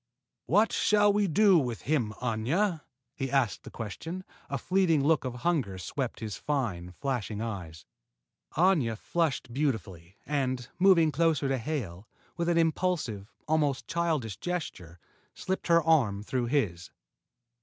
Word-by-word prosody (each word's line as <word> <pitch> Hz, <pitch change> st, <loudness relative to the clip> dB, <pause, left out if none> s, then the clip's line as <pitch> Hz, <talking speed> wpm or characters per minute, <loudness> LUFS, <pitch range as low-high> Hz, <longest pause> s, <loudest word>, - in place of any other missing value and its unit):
"What 210 Hz, +7 st, +4 dB
shall 205 Hz, -1 st, +4 dB
we 205 Hz, -1 st, +2 dB
do 190 Hz, +1 st, +5 dB
with 120 Hz, -5 st, -3 dB
him, 130 Hz, -7 st, 0 dB
Aña?" 155 Hz, -, 0 dB, 0.3 s
he 135 Hz, -2 st, -3 dB
asked 135 Hz, -6 st, +1 dB
the -, -, -10 dB
question, 160 Hz, -, -6 dB, 0.3 s
a -, -, -1 dB
fleeting 180 Hz, -6 st, +2 dB
look 160 Hz, +2 st, +3 dB
of 125 Hz, -1 st, -3 dB
hunger 140 Hz, -, +1 dB
swept 125 Hz, +7 st, -4 dB
his 105 Hz, -4 st, -4 dB
fine, 95 Hz, -12 st, -2 dB
flashing 120 Hz, -6 st, -2 dB
eyes. 90 Hz, -8 st, -6 dB, 0.7 s
Aña 155 Hz, -, +3 dB
flushed 155 Hz, -4 st, -1 dB
beautifully, 105 Hz, -, -3 dB
and, 130 Hz, -4 st, -1 dB
moving 175 Hz, -4 st, +5 dB
closer 155 Hz, -1 st, +2 dB
to 135 Hz, -1 st, 0 dB
Hale, 110 Hz, -, -4 dB, 0.3 s
with 170 Hz, 0 st, -1 dB
an 170 Hz, -, +2 dB
impulsive, 160 Hz, -, 0 dB, 0.2 s
almost 150 Hz, -4 st, +1 dB
childish 160 Hz, -, -1 dB
gesture, 150 Hz, -, -5 dB, 0.4 s
slipped 190 Hz, +1 st, -3 dB
her 170 Hz, -1 st, +5 dB
arm 125 Hz, -11 st, +3 dB
through 125 Hz, +2 st, -1 dB
his. 100 Hz, -, -1 dB
140 Hz, 135 wpm, -29 LUFS, 110-170 Hz, 0.7 s, do